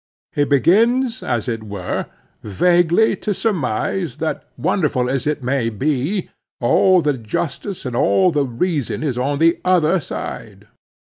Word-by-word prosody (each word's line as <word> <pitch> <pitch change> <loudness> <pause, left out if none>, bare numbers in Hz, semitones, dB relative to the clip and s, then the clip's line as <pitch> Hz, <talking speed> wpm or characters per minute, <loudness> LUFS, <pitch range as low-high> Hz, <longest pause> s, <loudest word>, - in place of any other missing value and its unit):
He 145 - +2
begins, 230 - +3
as 120 -1 -2
it 115 -2 -2
were, 100 -4 -4 0.3
vaguely 175 - +3
to 210 -2 -2
surmise 170 - -1
that, 160 0 -3
wonderful 150 -8 0
as 135 +1 -1
it 150 -2 -1
may 125 -2 0
be, 145 - -2 0.3
all 180 +8 +4
the 145 0 +2
justice 145 - -4
and 125 -2 -3
all 185 +8 +3
the 145 -3 +1
reason 140 +3 -2
is 140 -5 -1
on 135 +3 -1
the 165 +3 +3
other 180 -1 +3
side. 145 - -7
150 Hz, 140 wpm, -19 LUFS, 125-185 Hz, 0.3 s, all